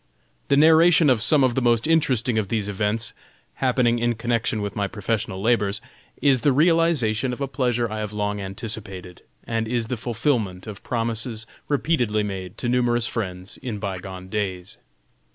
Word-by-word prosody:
The 140 Hz, -, +3 dB
narration 160 Hz, 0 st, +6 dB
of 115 Hz, -4 st, +2 dB
some 145 Hz, +3 st, +4 dB
of 130 Hz, -2 st, +3 dB
the 130 Hz, -, 0 dB
most 120 Hz, -2 st, +2 dB
interesting 130 Hz, -8 st, +2 dB
of 105 Hz, -, -2 dB
these 105 Hz, -1 st, -1 dB
events, 105 Hz, +3 st, -1 dB, 0.5 s
happening 125 Hz, -2 st, +2 dB
in 120 Hz, 0 st, +1 dB
connection 115 Hz, -1 st, -1 dB
with 100 Hz, -1 st, -4 dB
my 100 Hz, -1 st, 0 dB
professional 105 Hz, -1 st, -3 dB
labors, 105 Hz, -3 st, +2 dB, 0.4 s
is 135 Hz, -4 st, +4 dB
the 145 Hz, -, +4 dB
realization 145 Hz, -6 st, +2 dB
of 125 Hz, -, -5 dB
a 140 Hz, -, -1 dB
pleasure 125 Hz, -3 st, 0 dB
I 110 Hz, 0 st, -5 dB
have 105 Hz, -1 st, -4 dB
long 105 Hz, -1 st, -2 dB
anticipated, 95 Hz, -2 st, -7 dB, 0.2 s
and 115 Hz, -1 st, -2 dB
is 115 Hz, -1 st, -1 dB
the 125 Hz, -, -2 dB
fulfillment 115 Hz, -5 st, -1 dB
of 105 Hz, -2 st, -8 dB
promises 115 Hz, -1 st, -2 dB, 0.2 s
repeatedly 125 Hz, -8 st, +1 dB
made 95 Hz, -3 st, -5 dB
to 120 Hz, -, -3 dB
numerous 120 Hz, -1 st, +2 dB
friends 95 Hz, -5 st, -4 dB
in 120 Hz, -5 st, -4 dB
by 100 Hz, -2 st, -4 dB
gone 95 Hz, -1 st, -8 dB
days. 95 Hz, +1 st, -4 dB
115 Hz, 170 wpm, -23 LUFS, 105-125 Hz, 0.5 s, narration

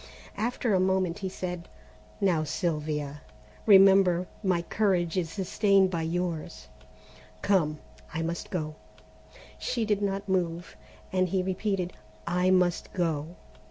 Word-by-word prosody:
After 235 Hz, 0 st, -1 dB
a 190 Hz, -, +4 dB
moment 185 Hz, -1 st, +1 dB
he 190 Hz, -2 st, -3 dB
said: 180 Hz, -2 st, -5 dB, 0.5 s
"Now, 180 Hz, -6 st, +2 dB
Sylvia, 150 Hz, -3 st, -2 dB, 0.5 s
remember 190 Hz, -3 st, +6 dB, 0.2 s
my 185 Hz, -4 st, +1 dB
courage 180 Hz, -4 st, +1 dB
is 175 Hz, -3 st, 0 dB
sustained 195 Hz, +1 st, +2 dB
by 170 Hz, -2 st, -1 dB
yours. 170 Hz, -1 st, -3 dB, 0.7 s
Come, 165 Hz, -7 st, +2 dB, 0.3 s
I 165 Hz, +1 st, -2 dB
must 170 Hz, +1 st, -4 dB
go!" 155 Hz, -4 st, -3 dB, 0.9 s
She 235 Hz, -2 st, -1 dB
did 210 Hz, -1 st, +1 dB
not 200 Hz, 0 st, -2 dB
move, 175 Hz, -2 st, -1 dB, 0.4 s
and 185 Hz, -1 st, +2 dB
he 185 Hz, +1 st, +1 dB
repeated: 185 Hz, -1 st, -1 dB, 0.3 s
"I 180 Hz, +1 st, +1 dB
must 180 Hz, -2 st, +2 dB
go." 165 Hz, -2 st, -1 dB
180 Hz, 125 wpm, -28 LUFS, 170-195 Hz, 0.9 s, remember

